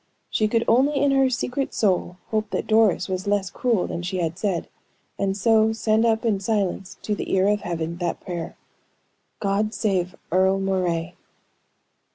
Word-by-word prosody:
She 215 - +2
could 230 +1 +1
only 265 +6 +4
in 280 0 +3
her 270 -1 +4
secret 255 +2 -2
soul 180 -3 +1
hope 215 -1 0
that - - -2
Doris 215 -5 +3
was 190 +1 -3
less 200 -2 0
cruel 235 -7 +1
than 170 - -4
she 185 +2 -3
had 170 0 -2
said, 195 -5 -1 0.5
and 195 0 0
so 220 +1 +3
send 220 +1 +2
up 225 +1 +1
in 210 -4 +2
silence 195 -2 -2
to 210 - -1
the - - -4
ear 190 0 +3
of 205 0 +2
Heaven, 170 -1 -3
that 175 -1 -2
prayer: 175 -3 -6 0.8
"God 205 +2 0
save 185 -4 0 0.2
Earle 190 +2 +3
Moray!" 180 -4 -1
200 Hz, 170 wpm, -24 LUFS, 185-220 Hz, 0.8 s, only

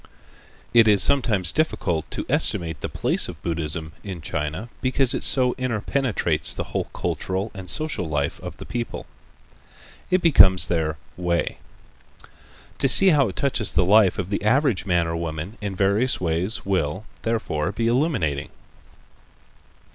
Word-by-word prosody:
It 115 -2 +6
is 105 -2 +5
sometimes 110 -10 +2
difficult 90 - -1
to - - -5
estimate 80 -3 0
the - - -4
place - - 0
of - - -9
Buddhism 80 -1 -2
in 95 -4 -6
China, 80 +6 -4
because 130 -1 +1
it - - -3
so 125 -2 +3
interpenetrates 115 - 0
the - - -3
whole - - -1
cultural 95 +3 -3
and 95 -3 -9
social 150 - -1
life 70 -2 -2
of - - -9
the - - -9
people. 120 -1 -5 1.0
It 185 -1 +1
becomes 95 - +6
their 80 -3 -1 0.2
"way." 85 -1 -1 1.2
To 135 - +3
see 195 +9 +7
how 145 -6 +4
it 95 - -7
touches 115 -1 0
the 90 - +3
life 100 0 +4
of 95 +1 -4
the 100 - -2
average 120 -2 +1
man 85 -2 +2
or 85 0 -3
woman 85 +5 -5
in 100 -2 -4
various 100 +7 +1
ways 90 +5 -1
will, 95 0 -1 0.2
therefore, 100 -8 -2
be 110 +3 -3
illuminating. 115 - 0
95 Hz, 145 wpm, -23 LUFS, 85-120 Hz, 1.2 s, see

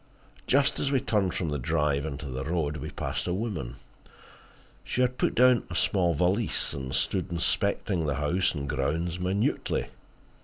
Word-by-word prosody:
Just 140 +1 +3
as 140 - 0
we 135 - +3
turned 100 -7 0
from 85 - -1
the 75 -1 -2
drive 75 +1 +1
into 75 0 -5
the 65 -1 -4
road 80 -1 -1
we 75 - -5
passed 75 - -3
a 90 - 0
woman. 90 - -3 1.1
She 125 - -1
had 125 0 +1
put - - +1
down 125 -2 +5
a 85 - -5
small 90 -3 +2
valise, 95 +8 +1
and 65 -2 -5
stood 90 +7 0
inspecting 85 0 0
the 75 - 0
house 85 +6 +1
and 70 -1 -4
grounds 80 +7 -1
minutely. 95 +4 0
85 Hz, 165 wpm, -28 LUFS, 75-100 Hz, 1.1 s, down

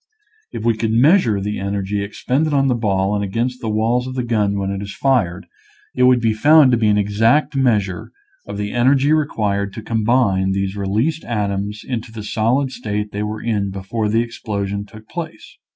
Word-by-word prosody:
If 110 - -6
we 115 -1 +3
could 110 0 -1
measure 120 - +4
the 105 +2 -3
energy 100 +1 -2
ex 100 - -9
pended 150 +4 +1
on 135 -1 +3
the - - +3
ball 100 -4 0
and 100 -1 -1
against 120 +6 -2
the 115 - -3
walls 115 +4 0
of 130 - -6
the 125 - -1
gun 105 -4 0
when 100 0 -2
it 100 0 -4
is 100 0 -7
fired 100 -10 0 0.5
it 125 - +3
would 125 -1 +5
be 115 -2 +1
found 145 +4 +5
to 120 - +3
be 110 - +2
an 105 0 +3
exact 115 +9 +2
measure 105 -9 0 0.4
of 100 - -6
the 105 0 -3
energy 135 +4 +3
required 105 -10 0
to 110 - -8
combine 110 -4 +1
these 95 0 -2
released 110 +11 -1
atoms 105 -2 -3
into 120 -3 -4
the 110 -2 -7
solid 120 +6 0
state 105 -4 -4
they 105 - -4
were 105 0 -4
in 105 -4 -1
before 100 +3 -3
the 115 +2 +2
explosion 100 -3 -4
took 110 +2 -14
place. 175 - -8
110 Hz, 200 wpm, -19 LUFS, 100-125 Hz, 0.5 s, would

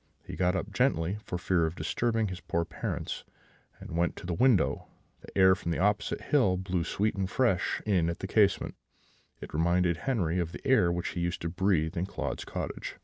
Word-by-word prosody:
He - - -7
got 90 +2 +1
up 95 - -3
gently, 85 +6 +1
for 90 - -3
fear 90 -2 +1
of 80 - -5
disturbing 115 -1 0
his 95 0 -6
poor 85 0 -1
parents, - - -4 0.6
and - - -8
went 85 +1 +1
to - - -9
the 90 - -2
window: 125 +2 +2 0.3
the - - -10
air 95 -1 +7
from 95 -3 -4
the 85 - 0
opposite 105 +2 +1
hill 105 -12 +2
blew 90 -2 -1
sweet 105 +5 0
and 95 -1 -2
fresh 105 -5 +1
in 90 -6 +2
at 85 - -3
the - - -5
casement; 100 0 +2 0.7
it - - -9
reminded 85 +2 +2
Henri 90 -8 0
of 85 -1 -2
the - - -7
air 110 -10 +4
which 85 0 -2
he - - -5
used 85 0 -2
to 85 - -1
breathe 90 -3 +1
in 90 +2 -1
Claude's - - -4
cottage. - - -5
90 Hz, 205 wpm, -29 LUFS, 85-100 Hz, 0.7 s, air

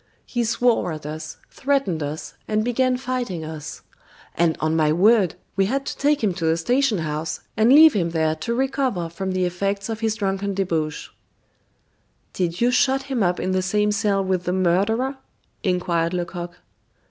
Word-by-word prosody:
He 240 -1 -1
swore 230 -4 +1
at 155 -1 -8
us, 155 +1 -6
threatened 270 - 0
us, 150 +2 -5
and 215 0 +1
began 255 +1 +1
fighting 245 -10 -3
us. 155 -1 -8 0.5
And, 170 -1 +1
on 155 +1 0
my 155 -2 +3
word, 195 +2 +4 0.2
we 195 0 +2
had 275 +4 -1
to - - -4
take 290 -1 +1
him 200 -4 +2
to 170 -2 -3
the 160 +1 +2
station 245 +6 +1
house, 155 -1 -3
and 220 +3 +4
leave 310 +2 +8
him 175 -5 0
there 160 -1 +1
to 235 +9 -2
recover 260 -9 -1
from 190 +3 -4
the 185 -1 +1
effects 195 +4 -2
of 225 -1 -3
his 220 -1 0
drunken 200 -1 -2
debauch." 165 -6 -2 1.2
"Did 175 0 -2
you 240 +1 +4
shut 265 +1 +2
him 270 -4 -2
up 180 -2 +1
in 185 - -1
the 185 0 +1
same 210 +3 +1
cell 205 -2 +1
with 185 -1 -1
the 180 - 0
murderer?" 205 +9 +1 0.4
inquired 180 -3 0
Lecoq. 175 0 -4
195 Hz, 175 wpm, -22 LUFS, 170-235 Hz, 1.2 s, leave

